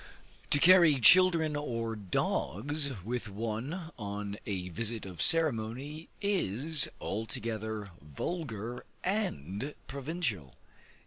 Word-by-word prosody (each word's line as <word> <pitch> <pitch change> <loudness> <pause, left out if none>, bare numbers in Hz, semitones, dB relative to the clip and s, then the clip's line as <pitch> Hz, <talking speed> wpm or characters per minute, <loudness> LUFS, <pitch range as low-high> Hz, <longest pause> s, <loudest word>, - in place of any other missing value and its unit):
To - - +4
carry 170 -3 +7
children 165 +2 +6
or 115 -6 -2
dogs 120 - -1
with 115 0 -3
one 115 - -4
on 100 0 -4
a 90 -3 -3
visit 110 +5 -3
of 90 -3 -6
ceremony, 145 0 +1
is 160 - +1
altogether 110 -1 -4
vulgar 115 - -5 0.2
and 145 - -2
provincial. 135 - -3
115 Hz, 90 wpm, -31 LUFS, 105-155 Hz, 0.2 s, carry